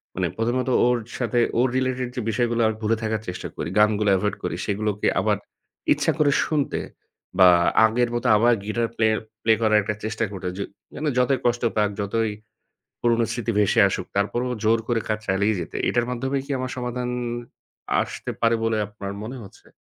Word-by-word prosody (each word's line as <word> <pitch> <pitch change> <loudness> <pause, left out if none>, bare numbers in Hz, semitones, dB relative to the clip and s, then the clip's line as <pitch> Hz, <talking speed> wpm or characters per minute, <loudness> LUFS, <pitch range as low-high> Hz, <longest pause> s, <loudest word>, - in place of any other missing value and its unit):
মানে - - 0
১ম 115 +2 0
ত - - +1 0.2
ওর 125 0 +3 0.2
সাথে 120 0 +1 0.2
ওর 130 - +4
related 130 -1 -1
যে 125 - -2
বিষয়গুলো 120 +1 0
আমি 110 - -1
ভুলে 110 +1 +2
থাকার 110 -1 -1
চেষ্টা 90 - -5
করি। - - -3
গানগুলো 105 -1 +3
avoid 105 +1 -1
করি, 85 - -2
সেগুলোকে 105 0 -1
আবার - - +1 0.6
ইচ্ছা - - +1
করে 145 -2 +4
শুনতে, 150 -3 -1 0.6
বা 95 -1 +9 0.4
আগের 120 +2 +1
মত 120 - -2
আবার 120 +3 +4
guitar 115 +2 0
play 110 -1 +3 0.3
play 110 -1 +5
করার 110 -1 +4
একটা 105 +1 -2
চেষ্টা 110 +1 -2
করতে। 95 -2 -5
যে 100 - -2 0.3
মানে 150 +1 -1
যতই 125 +1 +3
কষ্ট 120 0 +1
পাক, 105 -1 +3
যতই 110 +2 0 0.7
পুরনো 115 -1 +3
স্মৃতি 120 -1 -2
ভেসে 105 +3 +3
আসুক 90 -1 -3
তারপরও 120 +5 0
জোর 110 +1 +4
করে 115 -2 +1
কাজ 110 0 0
চালিয়ে 100 +3 +2
যেতে, 85 - -6
এটার 120 -1 +1
মাধ্যমে 130 +3 -1
কি - - -6
আমার 130 0 -3
সমাধান 125 0 -3 0.9
আসতে - - -5
পারে 115 0 +4
বলে 115 -1 +1
আপনার 100 -1 -7
মনে 125 +4 -6
হচ্ছে? - - -17
115 Hz, 180 wpm, -24 LUFS, 105-120 Hz, 0.9 s, বা